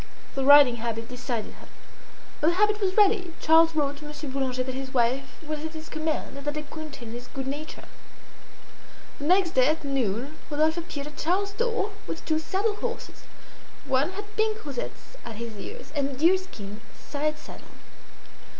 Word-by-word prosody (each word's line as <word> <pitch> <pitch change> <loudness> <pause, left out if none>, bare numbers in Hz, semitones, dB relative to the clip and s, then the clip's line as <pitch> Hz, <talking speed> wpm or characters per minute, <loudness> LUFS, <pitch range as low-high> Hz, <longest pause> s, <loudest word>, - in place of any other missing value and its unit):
The 270 - -1
riding 280 -3 +8
habit 230 0 -3
decided 245 -2 -4
her. - - -13 0.7
When 310 - +4
the 345 - 0
habit 420 +1 +3
was 380 0 +1
ready, 395 -5 +4
Charles 325 0 +6
wrote 285 -2 +1
to 300 - -10
Monsieur 295 -1 -6
Boulanger 260 -2 0
that 260 0 -4
his 265 0 -5
wife 255 +3 +1
was 305 0 -3
at 320 0 -4
his 315 0 -8
command, 310 -2 -2
and 280 - -10
that 295 - 0
they 305 - -3
counted 295 -5 -8
on - - -7
his 245 +1 -7
good 270 0 -5
nature. 290 +3 -5 1.4
The 285 - -4
next 365 +1 +4
day 255 -1 +5
at 310 +1 +1
noon 270 0 -1
Rodolphe 310 +2 +2
appeared 290 -4 -5
at 300 0 -10
Charles's 400 +4 +1
door 460 -2 0 0.2
with 325 - -5
two 315 -1 +2
saddle 405 +6 0
horses. 475 +1 -5 0.6
One 275 +6 +2
had 415 +2 -8
pink 435 -2 0
rosettes 285 - -6
at 230 - -7
his 230 0 -6
ears 475 - -8
and 280 -1 +1
a - - -5
deerskin 285 - +1 0.2
side 305 +1 -2
saddle. - - -12
300 Hz, 180 wpm, -27 LUFS, 265-355 Hz, 1.4 s, riding